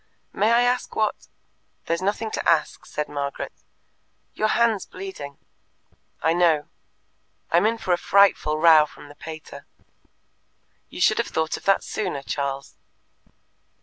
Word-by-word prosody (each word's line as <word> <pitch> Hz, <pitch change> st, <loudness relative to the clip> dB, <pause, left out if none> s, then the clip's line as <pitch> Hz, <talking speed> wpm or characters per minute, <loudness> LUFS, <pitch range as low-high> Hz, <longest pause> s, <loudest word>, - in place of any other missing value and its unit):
"May 215 Hz, +3 st, +2 dB
I 235 Hz, +1 st, +5 dB
ask 250 Hz, +1 st, 0 dB
what 215 Hz, -1 st, -1 dB, 0.3 s
" -, -, -45 dB
"There's 165 Hz, +1 st, -1 dB
nothing 210 Hz, +3 st, -1 dB
to -, -, -1 dB
ask," 160 Hz, -3 st, +1 dB
said 150 Hz, -, -3 dB
Margaret. 140 Hz, -1 st, -4 dB, 0.8 s
"Your 215 Hz, -, 0 dB
hand's 225 Hz, -3 st, +2 dB
bleeding." 185 Hz, -7 st, -8 dB, 0.9 s
"I 160 Hz, -, +3 dB
know." 165 Hz, -4 st, +2 dB, 0.8 s
"I'm 175 Hz, +6 st, +4 dB
in 230 Hz, +1 st, 0 dB
for 185 Hz, -5 st, 0 dB
a -, -, +2 dB
frightful 190 Hz, -5 st, +3 dB
row 155 Hz, -1 st, +6 dB
from 145 Hz, -, -14 dB
the 145 Hz, -, -13 dB
pater." 155 Hz, +1 st, -10 dB, 1.2 s
"You -, -, -8 dB
should -, -, +4 dB
have -, -, 0 dB
thought 160 Hz, -1 st, -1 dB
of -, -, -10 dB
that 195 Hz, -, +3 dB
sooner, 180 Hz, -10 st, -3 dB
Charles." 140 Hz, -1 st, -4 dB
170 Hz, 145 wpm, -24 LUFS, 150-205 Hz, 1.2 s, row